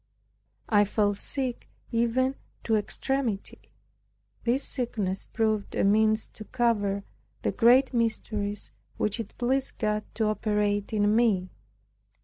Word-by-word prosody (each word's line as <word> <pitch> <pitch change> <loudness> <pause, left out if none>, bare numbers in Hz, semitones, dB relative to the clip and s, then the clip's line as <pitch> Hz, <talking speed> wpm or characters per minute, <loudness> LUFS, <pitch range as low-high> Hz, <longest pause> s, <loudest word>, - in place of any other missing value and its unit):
I 205 -2 +5
fell 205 0 +1
sick 255 +4 -3 0.2
even 235 +3 +1 0.3
to 225 - +2
extremity. 225 0 -2 0.8
This 250 +4 +2
sickness 210 -7 -2
proved 215 -2 -1
a - - +1
means 215 +2 +3
to 215 - -10
cover 210 -5 0 0.4
the - - +1
great 250 +3 +5
mysteries 215 -3 -1 0.3
which 210 +2 0
it 225 - -7
pleased 260 +2 +1
God 210 -1 0
to 225 - +1
operate 210 -1 0
in 210 0 +2
me. 205 -6 +2
220 Hz, 120 wpm, -27 LUFS, 205-240 Hz, 0.8 s, I